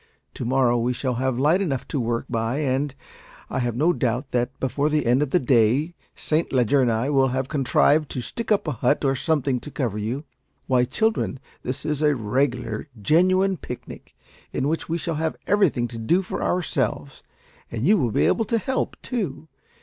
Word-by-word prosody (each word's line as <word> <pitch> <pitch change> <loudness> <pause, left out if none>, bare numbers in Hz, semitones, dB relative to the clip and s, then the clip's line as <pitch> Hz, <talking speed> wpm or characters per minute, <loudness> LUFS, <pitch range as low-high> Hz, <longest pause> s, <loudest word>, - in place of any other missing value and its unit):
To - - -5
morrow 125 -1 +2
we 120 +2 0
shall 130 +1 -2
have 130 -2 0
light 155 +8 +3
enough 140 -9 -2
to 145 - -1
work 115 -1 -1
by, 115 +3 -1
and 140 -1 -1 0.6
I - - -1
have 120 -2 -1
no 160 +8 +3
doubt 130 -1 -1
that 125 +1 -1
before 140 +3 0
the 150 -2 +1
end 125 +4 +3
of 150 - 0
the 160 - +3
day 130 +3 +2 0.2
Saint 155 +2 0
Leger 130 +1 +3
and 125 -2 +3
I 115 +6 0
will 135 -2 +4
have 130 0 -1
contrived 145 +1 +2
to - - -4
stick 230 - -5
up 205 -5 +2
a - - +1
hut 130 +4 +1
or 135 - +3
something 140 -3 0
to 150 - -9
cover 120 -8 -2
you. 120 +8 -3 0.4
Why, 125 -2 +3
children, 220 - 0 0.2
this 130 +2 -4
is 150 -1 -1
a 150 -1 +3
regular 120 +1 -1
genuine 185 - +3
picnic, 125 -4 -9 0.4
in 135 - -1
which 160 +2 -2
we 165 - 0
shall 165 0 -3
have 160 -1 -1
everything 185 -12 +2
to 115 - -7
do 170 +12 +2
for - - -5
ourselves, 170 -5 -1 0.5
and 115 +2 -2
you 205 +3 +5
will 125 - +1
be - - +2
able 225 - +2
to 230 +2 +1
help, 260 +5 -2
too. 180 - -4
135 Hz, 195 wpm, -24 LUFS, 125-160 Hz, 0.6 s, you